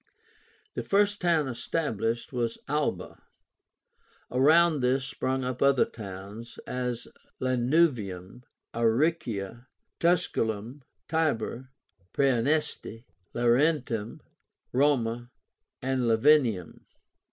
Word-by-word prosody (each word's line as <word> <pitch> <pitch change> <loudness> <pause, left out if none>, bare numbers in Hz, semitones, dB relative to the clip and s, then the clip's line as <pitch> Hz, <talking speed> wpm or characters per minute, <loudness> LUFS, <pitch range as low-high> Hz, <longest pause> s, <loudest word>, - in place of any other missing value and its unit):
The - - -3
first 205 +1 +1
town 165 -5 +2
established 120 -1 -2
was 120 -2 -1
ALBA; 150 +1 -2 1.1
around 155 +5 +5
this 130 +1 +1
sprung 130 -1 -2
up 125 -1 -4
other 140 -2 +4
towns, 105 +3 -9
as 125 -1 -3 0.3
Lanuvium, 125 - 0 0.3
Aricia, 115 - 0 0.3
Tusculum, 130 - 0 0.3
Tibur, 130 -5 -1 0.5
Praeneste, 135 -2 0 0.3
Laurentum, 120 -2 +1 0.5
Roma, 120 -3 +1 0.5
and 130 0 0
Lavinium. 115 - +3
125 Hz, 75 wpm, -28 LUFS, 115-150 Hz, 1.1 s, around